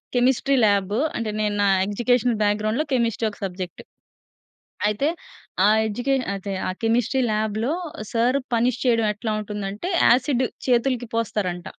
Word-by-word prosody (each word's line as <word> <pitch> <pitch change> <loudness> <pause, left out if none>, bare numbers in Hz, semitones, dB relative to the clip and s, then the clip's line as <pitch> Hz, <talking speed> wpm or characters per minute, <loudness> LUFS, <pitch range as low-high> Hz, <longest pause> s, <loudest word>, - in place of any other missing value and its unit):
Chemistry 260 +2 +2
lab 200 0 +1 0.2
అంటే 230 -2 -2
నేను 210 -1 0
నా - - +3 0.2
ఎగ్జుకేషన్ 240 +3 +1
బ్యాక్‌గ్రౌండ్‌లో 215 +7 0
కెమిస్ట్రీ 230 -2 +1
ఒక - - -15
సబ్జెక్ట్. 180 -1 -6 1.1
అయితే 210 +8 0 0.6
ఆ - - +7 0.2
ఎడ్యుకేష 250 +5 0
అదె 195 0 -5
ఆ - - 0
కెమిస్ట్రీ 240 +3 +1
లాబ్‌లో 215 +4 -1 0.4
సర్ 240 +3 +2 0.2
పనిష్ 240 +1 +1
చేయడం 230 -3 +3
ఎట్లా 220 +2 -4
ఉంటుంది 210 -1 -5
అంటే? 210 - -5 0.2
యాసిడ్ 255 +1 +3 0.2
చేతులకి 245 0 +1
పోస్తారంట. 195 -6 -2
230 Hz, 130 wpm, -23 LUFS, 205-245 Hz, 1.1 s, ఆ